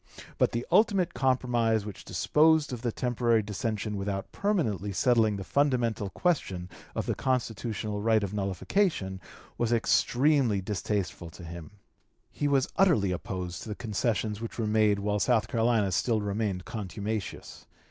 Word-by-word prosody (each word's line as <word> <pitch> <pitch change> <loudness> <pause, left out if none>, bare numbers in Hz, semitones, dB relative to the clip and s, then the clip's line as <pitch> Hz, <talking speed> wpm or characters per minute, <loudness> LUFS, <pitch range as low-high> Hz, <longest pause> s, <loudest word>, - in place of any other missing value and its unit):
But - - +3
the 120 +1 -2
ultimate 195 -2 +3
compromise 120 -5 +1
which 105 -3 -8
disposed 155 -2 +3
of 120 - -5
the 120 -1 -1
temporary 120 -2 +1
dissension 105 +1 -3
without 100 0 -3
permanently 120 - -1
settling 110 +1 +3
the 95 - -5
fundamental 120 -5 +1
question 95 - -1 0.2
of - - -2
the - - 0
constitutional 110 -4 -2
right 110 -1 +3
of 100 0 -3
nullification 100 - -1 0.4
was 120 -1 +1
extremely 125 0 +3
distasteful 95 -2 -3
to 85 +2 -12
him. 85 -1 -8 0.6
He 145 - -1
was 135 -2 +2
utterly 155 - +4
opposed 90 -1 -4
to - - -8
the 105 - -3
concessions 110 -1 -1
which 115 - -6
were 115 - -1
made 105 -1 +3
while 105 +1 -1
South 110 -1 +2
Carolina 110 -2 +2
still 110 +5 +1
remained 100 -2 -2
contumacious. 105 0 -5
110 Hz, 145 wpm, -28 LUFS, 100-125 Hz, 0.6 s, utterly